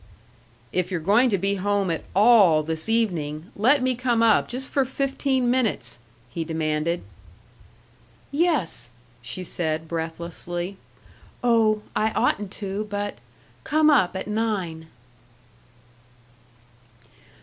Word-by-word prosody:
"If 180 -1 -1
you're 180 -3 -2
going 210 +10 +4
to 200 - +1
be 200 +2 0
home 200 -2 +1
at 165 - -3
all 200 -7 +6
this 160 +5 -4
evening, 170 -8 -1
let 255 +6 +3
me 255 0 +2
come 240 -2 +1
up 225 - +4
just 260 +2 -5
for 275 - +2
fifteen 265 -1 0
minutes!" 245 - -1 0.3
he 165 +7 -4
demanded. 160 +1 -1 1.3
"Yes!" 280 - 0 0.3
she 130 +9 -4
said, 160 -2 -2
breathlessly. 170 +3 -5 0.7
"Oh, 220 -3 +3
I 220 - +2
oughtn't 205 -1 +1
to, 200 +1 -4
but 205 0 -3 0.4
come 310 0 +3
up 195 -11 +3
at 190 - -3
nine." 200 -7 -2
200 Hz, 115 wpm, -24 LUFS, 165-240 Hz, 1.3 s, all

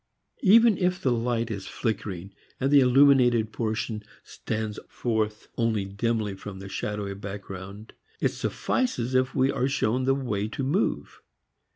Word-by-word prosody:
Even 225 +1 +6
if 180 0 +1
the 135 -9 +1
light 115 -1 0
is 100 -3 -5
flickering 100 -4 -3 0.3
and 135 +1 +1
the 145 - +8
illuminated 125 -4 +5
portion 110 -1 -2 0.2
stands 110 -1 -4
forth 110 -2 -2
only 110 -4 +1
dimly 105 +1 -1
from 95 0 -8
the 95 +1 -8
shadowy 100 +1 -3
background, 100 +1 -8 0.3
it - - +1
suffices 130 - -1
if 130 +1 +1
we 130 +1 +3
are 130 - 0
shown 130 -2 0
the 135 0 +3
way 110 -7 -2
to 135 +5 -4
move. 160 +11 -1
115 Hz, 145 wpm, -26 LUFS, 105-130 Hz, 0.3 s, the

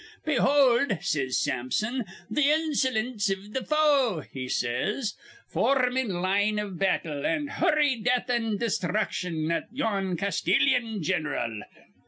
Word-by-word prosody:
'Behold,' 270 - +3
says 140 -7 0
Sampson, 175 - -1 0.2
'th' 300 - 0
insolince 260 -8 +1
iv 195 +2 -4
th' 265 - -3
foe,' 285 - +3
he 130 -1 -5
says. 210 - -1 0.3
'For 275 - +2
rm 250 -1 +1
in 260 -4 0
line 205 +3 +1
iv 205 -4 -4
battle, 160 -7 0
an' 295 - 0
hur 290 +1 +1
rl 270 -6 +2
death 245 +2 +1
an' 225 -4 0
desthruction 180 -6 -1
at - - -2
yon 200 -8 -1
Castilyan 220 - +1
gin'ral.' 150 - -2
215 Hz, 130 wpm, -27 LUFS, 180-260 Hz, 0.3 s, Behold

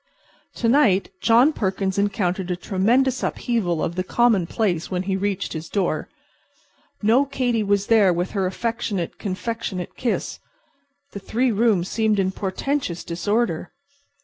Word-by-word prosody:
To 235 - -1
night 230 -8 +3
John 240 +7 +5
Perkins 190 -3 -1
encountered 190 -2 -1
a 180 - 0
tremendous 235 +9 +1
upheaval 195 -10 -1
of 170 - -1
the 185 +1 -2
commonplace 195 -4 +1
when 185 -1 -2
he 190 0 -1
reached 195 0 -2
his 160 0 -6
door. 195 -3 -1 0.9
No 230 +6 +5
Katy 255 -4 -1
was 200 -1 +1
there 210 -4 +5
with 175 +1 -1
her 195 -3 0
affectionate, 210 -3 -3
confectionate 195 -1 -4
kiss. 240 - -2 0.7
The 200 - -6
three 240 +6 0
rooms 210 -5 +2
seemed 220 -1 +1
in 190 -1 +1
portentous 190 - -2
disorder. 180 0 -1
200 Hz, 135 wpm, -23 LUFS, 185-230 Hz, 0.9 s, John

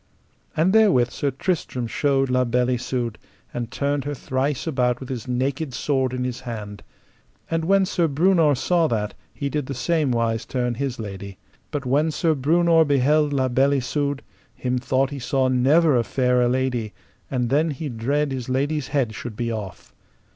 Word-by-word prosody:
And 170 +5 +3
therewith 190 - +4
Sir 145 - -1
Tristram 135 -3 -2
showed 135 +2 +1
La 125 0 +3
Beale 125 +1 +1
Isoud, 120 -2 -2 0.3
and 120 -2 -4
turned 140 +1 -1
her 145 0 -3
thrice 130 +1 -2
about 125 -6 0
with 130 - -9
his 125 -2 -5
naked 130 +2 -2
sword 130 -2 0
in 125 0 -2
his 125 -1 -3
hand. 105 -5 -7 0.7
And 165 0 0
when 195 +2 +4
Sir 175 -2 +1
Breunor 160 0 +3
saw 170 +5 +2
that, 105 -4 -2 0.2
he 140 - -4
did 145 -1 -2
the 140 - -4
same 155 +1 +1
wise 115 -2 0
turn 125 -2 -2
his 130 0 -3
lady. 100 -2 -7 0.3
But 145 -3 -4
when 145 +5 +2
Sir 160 +1 +1
Breunor 165 +4 +4
beheld 145 +1 +2
La 135 -2 +1
Beale 135 +3 +3
Isoud, 140 +2 -1 0.3
him 125 0 -1
thought 130 +2 0
he 140 - -5
saw 130 +1 +1
never 140 +5 +4
a 120 - +3
fairer 125 0 +2
lady, 125 -4 -1 0.4
and 125 -2 -1
then 155 +4 +3
he 150 +1 -4
dread 140 +4 -1
his 130 -2 -4
lady's 140 +2 0
head 135 -6 0
should 115 0 -7
be 115 +1 -2
off. 105 -4 -7
130 Hz, 175 wpm, -23 LUFS, 125-150 Hz, 0.7 s, therewith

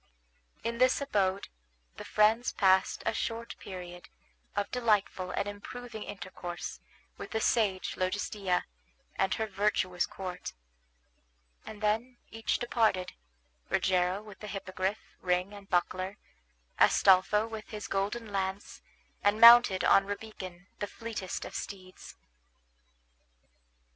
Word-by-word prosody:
In 235 +1 -2
this 255 0 +4
abode 200 -8 0 0.5
the - - -7
friends 220 +3 +3
passed 190 -1 +3
a - - +1
short 230 +1 -3
period 175 -2 -9 0.5
of 205 - -1
delightful 210 -6 +1
and 200 - -2
improving 220 +3 -7
intercourse 175 - -6 0.4
with - - -7
the 220 - -1
sage 210 -5 +1
Logestilla 185 0 -1 0.5
and 190 -1 +1
her 220 - -1
virtuous 195 -3 0
court; 180 -2 -6 1.1
and 215 -1 -9
then 225 +4 0
each 225 0 -1
departed, 220 -6 +1 0.6
Rogero 185 +2 +1
with 210 -3 -12
the 210 - -8
Hippogriff, 195 0 -2 0.2
ring, 180 +2 0
and 200 -1 -12
buckler; 185 +2 0 0.6
Astolpho 195 +3 +5
with 220 -1 -8
his 210 -1 -6
golden 205 +3 -2
lance, 195 0 -3 0.4
and 205 +2 +3
mounted 235 -5 +9
on 195 0 +5
Rabican, 195 -4 -7
the 205 - -2
fleetest 220 -4 -5
of - - -8
steeds. 185 -2 -8
200 Hz, 115 wpm, -30 LUFS, 185-220 Hz, 1.1 s, mounted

